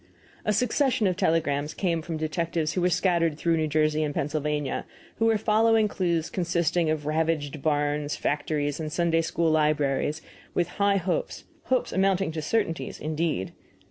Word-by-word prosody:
A 210 - +2
succession 250 +2 +1
of 185 -2 +2
telegrams 155 -5 0
came 170 -4 0
from 165 0 -4
detectives 160 0 -1
who 180 - -1
were 180 - +3
scattered 170 -3 +1
through 165 +1 +1
New 155 -1 0
Jersey 155 0 +1
and 150 -1 -2
Pennsylvania, 150 -1 -1
and - - -7 0.3
who 225 - +3
were 225 -1 +3
following 220 +1 +3
clues 170 -5 -1
consisting 170 -2 0
of 155 -2 -1
ravaged 155 -2 -1
barns, 145 -1 0
factories, 145 0 -1
and 155 -1 -4
Sunday 165 0 +2
school 165 0 0
libraries, 150 0 +1 0.3
with 175 -1 +1
high 200 0 +4
hopes 180 -1 -2 0.2
hopes 255 -1 0
amounting 190 -2 +2
to 160 0 -4
certainties, 165 0 -1
indeed. 155 - -2
165 Hz, 160 wpm, -26 LUFS, 150-180 Hz, 0.3 s, high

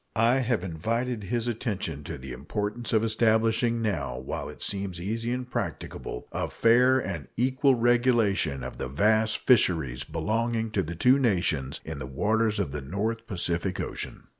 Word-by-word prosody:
I 115 +3 +4
have 120 -7 0
invited 110 +6 -2
his 120 +3 -1
attention 105 - -3
to - - -5
the 65 0 -8
importance 105 - -4
of 110 -1 +3
establishing, 115 +1 +2
now 75 - -1
while 65 - -5
it - - -8
seems 95 -3 -3
easy 115 +6 -2
and 125 0 -3
practicable, - - -5
a - - -2
fair 125 +3 +4
and 80 - -3
equal 130 +2 +3
regulation 115 - +2
of - - -6
the - - -2
vast 110 - +2
fisheries 80 - +2
belonging 110 - -1
to 105 - +1
the 85 0 -5
two 125 +10 +4
nations 85 - 0
in 80 -2 -5
the 65 - -5
waters 110 +10 +1
of 70 - -1
the 75 0 -4
North 110 +10 -3
Pacific 90 -1 -1
Ocean. - - -5
110 Hz, 165 wpm, -27 LUFS, 85-120 Hz, -, I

